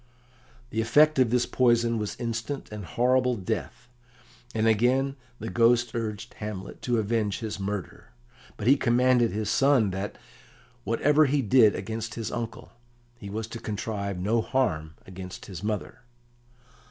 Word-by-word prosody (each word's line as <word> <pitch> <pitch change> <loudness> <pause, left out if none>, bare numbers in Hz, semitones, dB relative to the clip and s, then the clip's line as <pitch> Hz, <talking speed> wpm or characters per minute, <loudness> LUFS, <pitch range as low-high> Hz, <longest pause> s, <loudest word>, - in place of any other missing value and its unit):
] 120 0 -29
The 110 - 0
effect 150 +6 +4
of 125 -3 +4
this 125 +1 +2
poison 120 -2 +2
was 105 -1 -3
instant 115 +3 -4
and 105 -2 -6
horrible 125 - +2
death, 110 +4 -4 0.7
and 110 0 +1
again 125 +5 +2 0.2
the - - -6
Ghost 120 0 +3
urged 115 -1 -4
Hamlet 105 -3 -6
to 120 -1 0
avenge 110 -1 0
his 110 -3 -5
murder. 100 -2 -5 0.5
But 105 - -5
he 135 +4 +6
commanded 125 -1 +3
his 105 0 -2
son 135 -7 +3
that, 95 +2 -4 0.7
whatever 145 +6 +3
he 140 0 +1
did 110 -2 +5
against 110 +3 -5
his 115 -2 -4
uncle, 115 -1 -5 0.5
he 100 - -8
was 110 +2 -3
to 115 - -7
contrive 105 -2 -4
no 110 +6 +1
harm 80 -12 -1
against 95 0 -9
his 90 -4 -8
mother. 105 +3 -3
115 Hz, 150 wpm, -27 LUFS, 105-125 Hz, 0.7 s, he